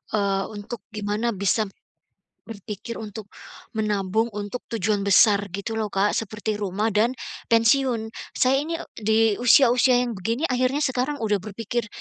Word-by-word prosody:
eee, 195 -2 +1
untuk 205 +1 -7
gimana 210 +2 -1
bisa 200 +2 +1 0.8
berpikir 215 +1 -7
untuk 215 -1 -7 0.5
menabung 210 +1 0
untuk 205 +4 -5
tujuan 210 -1 0
besar, 200 0 +5
gitu 200 +5 -4
loh, 215 -2 -2
Kak, 200 +2 +2
seperti 215 0 -3
rumah 205 +2 -1
dan 220 +3 +3 0.4
pensiun. 230 0 +3 0.3
Saya 260 +1 +3
ini, 330 +2 -3
eee, - - -10
di 220 0 +2 0.2
usia-usia 245 +1 +5
yang 240 -3 -3
begini 230 - -2
akhirnya 255 +3 +1
sekarang 260 +3 -1
sudah 210 -2 +1
berpikir 225 +3 -3
220 Hz, 140 wpm, -24 LUFS, 205-240 Hz, 0.8 s, besar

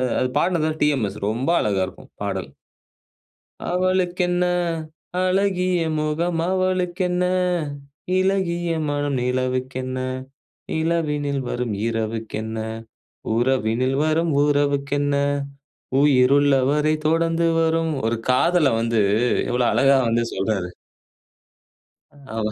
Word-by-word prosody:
அ - - +1
அது 130 - +1
பாடுனது 170 -3 +1
வந்து 155 0 -3
டிஎம்எஸ், 130 -9 +1
ரொம்ப 120 +7 -1
அழகா 100 -3 +1
இருக்கும். 95 - -13
பாடல். - - -3 1.2
அவளுக்கென்ன, 180 -1 +1 0.8
அழகிய 185 -1 +1 0.2
முகம் 165 +3 -1
அவளுக்கென்ன, 185 -1 0 0.9
இளகிய 185 -3 0 0.2
மனம் 145 -1 -1
நிலவுக்கென்ன, 130 +1 -2 0.8
இளவினில் 150 -4 0
வரும் 120 -3 -2
இரவுக்கென்ன, 110 -1 -3 0.8
உறவினில் 130 +1 +1
வரும் 160 +1 +1
உறவுக்கென்ன 145 0 +1 0.9
உயிருள்ள 140 0 +4 0.2
வரை 150 +1 +2
தொடர்ந்து 165 +1 +2
வரும். 165 0 +1
ஒரு 115 +1 0
காதல 150 +2 +3
வந்து 115 -1 +1 0.5
எவ்ளோ 125 0 +1
அழகா 135 0 +4
வந்து 115 +1 +1
சொல்றாரு. 95 -2 -1 1.7
ஆமா. 110 -1 -1
145 Hz, 90 wpm, -22 LUFS, 125-170 Hz, 1.7 s, உயிருள்ள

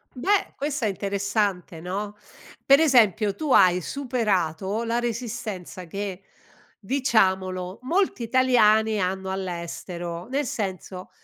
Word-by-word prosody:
Beh, 390 +10 +1
questa 285 -4 -2
è - - +1
interessante, 200 -3 -2
no, 200 +5 -4 0.5
per 275 +1 +7
esempio 225 - +4
tu 305 -3 -3
hai 180 -5 +5
superato 210 - -1
la 230 0 -1
resistenza 220 -6 -5
che, 195 +2 -5 0.6
diciamolo, 190 -7 0
molti 335 -3 0
italiani 220 -3 +3
hanno 190 0 -2
all'estero. 175 -1 -5
Nel 275 +3 -1
senso 190 -4 -5
205 Hz, 105 wpm, -25 LUFS, 185-240 Hz, 0.6 s, per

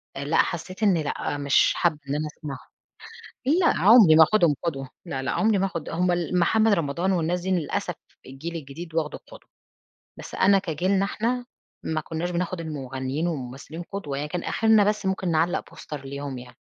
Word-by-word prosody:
آآ، 140 - -4
لأ، 155 - +1
حسيت 185 +5 -1
إن 195 -5 +4
لأ 145 -1 -2
مش 140 -1 +3
حابَّة 155 -4 +1
إن 145 - 0
أنا 155 +1 -2
أسمعه. 150 -2 -7 0.9
لأ، 330 +4 +3
عُمري 195 -5 +8
ما 160 - +9
آخُدهم 170 -6 +3
قدوة، 135 -6 -3 0.2
لا، 135 -5 -4
لا 130 - -2
عمري 215 -2 +2
ما 195 - +2
آخُد 170 -5 -5
هم 180 +2 +1
ال 175 +1 0
محمد 220 +5 +3
رمضان 170 +2 0
والناس 175 0 0
دي 190 +2 -3
للأسف 175 -5 -1 0.3
الجيل 155 +6 -7
الجديد 160 +3 -8
واخده 155 -2 -1
قُدوة، - - -15 0.7
بس - - -9
أنا 195 0 +4
كجيلنا 185 +3 0
إحنا 240 +5 -1 0.4
ما 160 -1 -2
كُناش 165 +3 -4
بناخد 175 0 -2
المغنيين 135 0 -3
والممثلين 145 +3 -6
قُدوة، 150 -9 -4
يعني 150 +1 -3
كان 175 +1 -3
أخرنا 220 -2 +4
بس 210 -1 0
ممكن 190 -2 -1
نعلّق 165 +3 0
بوستر 150 -3 -8
ليهم 140 -1 -5
يعني. 125 0 -10
170 Hz, 180 wpm, -25 LUFS, 145-190 Hz, 0.9 s, ما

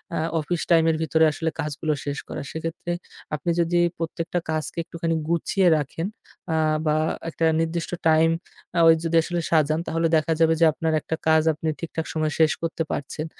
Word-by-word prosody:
আ - - -1 0.2
office 165 +3 -2
time 165 -1 +5
এর 160 - -1
ভিতরে 160 0 +3
আসলে 160 +2 -2
কাজগুলো 155 0 -2
শেষ 145 0 -3
করা। - - -4
সেক্ষেত্রে 165 +2 -4 0.4
আপনি 160 +4 -1
যদি 170 +1 +1 0.2
প্রত্যেকটা 165 +1 -2
কাজকে 155 0 -3
একটুখানি 165 0 -2
গুছিয়ে 180 +2 +2
রাখেন, 155 +4 -3 0.5
আ - - +1 0.3
বা 155 0 +2 0.3
একটা 165 0 -1 0.2
নির্দিষ্ট 165 +1 -2 0.2
time 160 +1 +4 0.4
আ - - +4
ওই 165 - +9
যদি 165 0 0
আসলে 175 +1 -2
সাজান 155 -1 +3
তাহলে 165 +1 +1
দেখা 155 +1 +1
যাবে 165 0 +5
যে - - +8
আপনার 160 0 -1
একটা 160 - -3
কাজ 160 0 +5
আপনি 155 +1 -5
ঠিকঠাক 160 -1 -4
সময়ে 155 -1 0
শেষ 160 -1 +5
করতে 165 0 -2
পারছেন। 150 +2 -4
160 Hz, 180 wpm, -24 LUFS, 155-165 Hz, 0.5 s, ওই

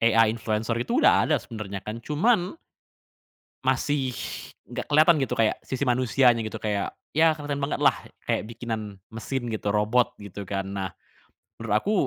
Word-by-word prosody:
AI 115 0 +6
influencer 110 0 -1
itu 120 - +1
udah - - +5
ada - - +4
sebenarnya 100 -3 -6
kan 110 +2 -5
cuman 175 - +1 1.1
Masih 140 -3 +1 0.6
enggak - - -6
kelihatan 155 +3 +6
gitu 130 - -2
kayak 110 -1 +3
sisi 130 +1 -2
manusianya 125 0 +4
gitu 110 - -5
kayak 105 -2 -1 0.2
ya 160 +1 +6
keren 145 -2 -3
banget 140 - -1
lah, - - +5 0.3
kayak - - +1
bikinan 110 -3 -5
mesin 120 +2 -4
gitu, 110 -2 -2
robot 105 +4 +2
gitu, 100 0 -7
kan. 95 0 -3
Nah, 95 -1 -2 0.7
menurut 105 - -1
aku 160 - 0
115 Hz, 155 wpm, -26 LUFS, 105-140 Hz, 1.1 s, AI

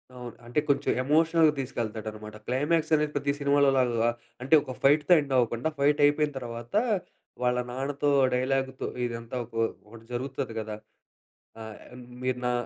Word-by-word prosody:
అవును. 125 -1 -8
అంటే 120 +5 0
కొంచెం 140 - +2
ఎమోషనల్‌గా 160 +2 +4
తీసుకెళ్తాడనమాట. 110 -4 -5
క్లైమాక్స్ 155 +5 0
అనేది 150 0 0
ప్రతి 140 0 0
సినిమాలో 140 0 +3
లాగా 120 -2 +2 0.3
అంటే 135 +5 +4
ఒక 130 - -6
ఫైట్‌తో 150 +4 +5
ఎండ్ 140 -2 -5
అవ్వకుండా, 120 +4 +1
ఫైట్ 145 +1 +3
అయిపోయిన 150 0 +2
తర్వాత 120 - -7 0.7
వాళ్ళ 125 0 +2
నాన్నతో 140 +3 -1 0.2
డైలాగ్‌తో 130 +1 -1 0.2
ఇదంతా 115 +1 -5 0.2
ఒ - - -1 0.3
ఒకటి 115 +1 -14
జరుగుతాది 130 -2 -4
కదా! 110 -1 -5 0.9
ఆహ్, 110 -1 -8 0.4
"మీరు 130 -1 -1
నా 125 - +1
130 Hz, 140 wpm, -27 LUFS, 120-145 Hz, 0.9 s, ఫైట్‌తో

